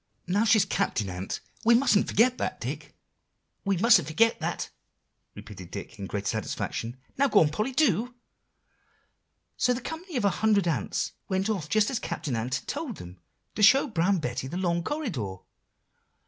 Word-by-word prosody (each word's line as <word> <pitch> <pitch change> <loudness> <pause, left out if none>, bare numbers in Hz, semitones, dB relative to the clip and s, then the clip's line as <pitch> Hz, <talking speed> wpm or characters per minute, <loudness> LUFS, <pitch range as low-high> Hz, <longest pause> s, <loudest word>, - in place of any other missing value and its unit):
"Now 200 +5 +1
she's 215 -2 +5
Captain 115 - -1
Ant; 90 +2 -5 0.2
we 235 +1 +6
mustn't 230 -5 +3
forget 245 +4 +3
that, - - -2
Dicky." - - -5 0.7
"We 195 -2 +1
mustn't 195 - +5
forget 225 +9 +2
that," - - -3 0.6
repeated 95 -4 -10
Dick, 105 - -8
in 100 - -5
great 100 +3 -4
satisfaction. 115 +2 -3 0.2
"Now 280 - +5
go 215 - +5
on, 155 - +4
Polly, 215 - -2
do." 245 - +1 1.4
"So 250 0 +2
the - - -3
company 320 +3 -6
of 225 - 0
a 200 - +4
hundred 210 -4 +3
ants 165 - -1 0.2
went 190 +2 0
off 170 -8 -3
just 215 +3 +2
as 250 - -1
Captain 145 -7 -3
Ant 120 +3 -1
had 130 - -5
told 285 - -4
them, 90 +1 -11 0.3
to - - -4
show 265 +7 +7
Brown 195 - +1
Betty 125 -4 -3
the 170 - -5
long 170 -2 0
corridor." 175 - -3
195 Hz, 170 wpm, -27 LUFS, -, 1.4 s, show